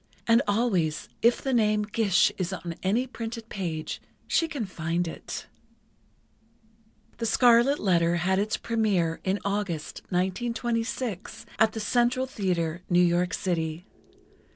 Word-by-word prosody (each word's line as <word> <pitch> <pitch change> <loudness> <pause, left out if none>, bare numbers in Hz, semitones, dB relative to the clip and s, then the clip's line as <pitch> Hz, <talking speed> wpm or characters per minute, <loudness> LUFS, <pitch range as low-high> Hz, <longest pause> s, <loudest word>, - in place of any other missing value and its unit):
And 230 +1 +5
always, 200 -8 +1
if 235 +1 +3
the 270 - 0
name 215 -3 +3
'Gish' 210 -3 +3
is 185 -1 -1
on 175 -2 -5
any 215 +7 +1
printed 230 -2 -7
page, 165 -5 -4 0.2
she 330 - +2
can 285 -8 -3
find 170 -1 -2
it." 165 - -6 1.7
"The 230 - -1
Scarlet 240 +4 +5
Letter" 170 - +2
had 190 +3 +1
its 210 +2 0
première 200 -8 0
in 190 +1 +1
August, 200 -6 -2
1926, 230 +3 -2
at 220 0 +4
the 220 - -4
Central 245 +3 +2
Theatre, 175 -8 -2
New 175 -1 +4
York 175 +1 +1
City. 165 -1 -2
200 Hz, 130 wpm, -27 LUFS, 175-230 Hz, 1.7 s, And